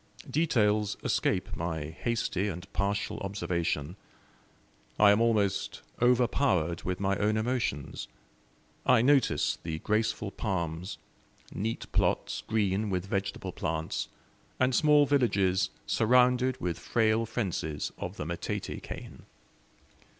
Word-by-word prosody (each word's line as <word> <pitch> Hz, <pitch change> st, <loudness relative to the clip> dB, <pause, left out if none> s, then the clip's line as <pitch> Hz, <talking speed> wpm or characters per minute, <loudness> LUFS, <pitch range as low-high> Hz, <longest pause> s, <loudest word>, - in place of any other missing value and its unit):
Details 105 Hz, -9 st, +2 dB
escape -, -, 0 dB
my 80 Hz, -3 st, -3 dB
hasty 105 Hz, 0 st, -1 dB
and 90 Hz, -2 st, -5 dB
partial 100 Hz, +2 st, -1 dB
observation. 85 Hz, -4 st, -2 dB, 1.0 s
I 105 Hz, -1 st, +7 dB
am 105 Hz, +2 st, +3 dB
almost 100 Hz, -4 st, +1 dB, 0.2 s
overpowered 120 Hz, -, +2 dB
with 90 Hz, 0 st, -3 dB
my 100 Hz, 0 st, +1 dB
own 105 Hz, +1 st, +1 dB
emotions. 110 Hz, -, -2 dB, 0.8 s
I 125 Hz, -3 st, +5 dB
notice 140 Hz, 0 st, +3 dB
the 80 Hz, -1 st, -4 dB
graceful 105 Hz, +1 st, -1 dB
palms, 90 Hz, -4 st, -3 dB, 0.6 s
neat 110 Hz, +3 st, -3 dB
plots, -, -, 0 dB
green 105 Hz, -1 st, +1 dB
with 90 Hz, -1 st, -1 dB
vegetable 95 Hz, -1 st, -3 dB
plants, 80 Hz, -2 st, -3 dB, 0.5 s
and 130 Hz, 0 st, +3 dB
small 150 Hz, +1 st, +5 dB
villages 100 Hz, -9 st, +2 dB, 0.2 s
surrounded 125 Hz, +2 st, +3 dB
with 85 Hz, -2 st, -2 dB
frail 110 Hz, 0 st, +1 dB
fences 90 Hz, -10 st, -2 dB
of -, -, -5 dB
the -, -, -4 dB
matete 85 Hz, +1 st, -4 dB
cane. -, -, -9 dB
100 Hz, 110 wpm, -29 LUFS, 90-115 Hz, 1.0 s, I